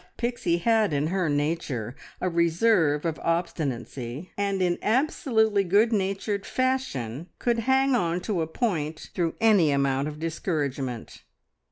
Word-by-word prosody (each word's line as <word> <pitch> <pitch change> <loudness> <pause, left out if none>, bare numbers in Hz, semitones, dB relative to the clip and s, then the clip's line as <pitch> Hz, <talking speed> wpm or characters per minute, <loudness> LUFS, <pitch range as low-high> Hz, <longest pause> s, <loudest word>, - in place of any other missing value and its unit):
But 180 0 -30
Pixie 235 -8 0
had 220 -1 +2
in 145 +1 +1
her 185 -4 +1
nature 145 -6 -2 0.2
a - - -1
reserve 170 -2 +2
of 165 -2 -2
obstinacy, 145 -4 -3
and 200 -1 -1
in 180 -1 +1
absolutely 220 -4 +2
good 205 +6 +3
natured 200 0 -1
fashion 175 - -2
could 235 -1 0
"hang 265 +1 +4
on" 175 -7 +1
to 190 -3 -1
a 160 - -1
point 160 -5 -2
through 170 -2 -1
any 210 -8 +5
amount 140 0 +1
of 150 0 -6
discouragement. 145 - -3
170 Hz, 140 wpm, -26 LUFS, 150-215 Hz, 0.2 s, any